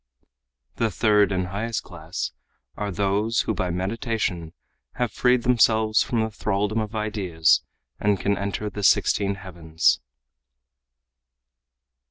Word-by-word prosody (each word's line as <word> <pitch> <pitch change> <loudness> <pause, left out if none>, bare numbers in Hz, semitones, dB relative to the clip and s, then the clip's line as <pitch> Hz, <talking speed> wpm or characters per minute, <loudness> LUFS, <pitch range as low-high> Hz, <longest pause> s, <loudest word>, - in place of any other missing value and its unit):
The 115 - +1
third 105 0 +3
and 90 -1 -1
highest 110 +4 -3
class 85 -2 -5 0.4
are 105 -1 -3
those 100 +4 +1
who 110 - -1
by 90 -2 -2
meditation 95 -2 -2 0.4
have 120 -3 -1
freed 125 +1 +2
themselves 110 -3 +3
from 115 -2 0
the 110 0 -2
thraldom 105 +1 -1
of 110 0 -4
ideas 100 -7 +2 0.4
and 105 -2 +1
can 100 0 +1
enter 100 +2 -3
the 105 - -6
sixteen 100 0 +3
heavens." 85 -6 0
105 Hz, 120 wpm, -24 LUFS, 95-110 Hz, 0.4 s, third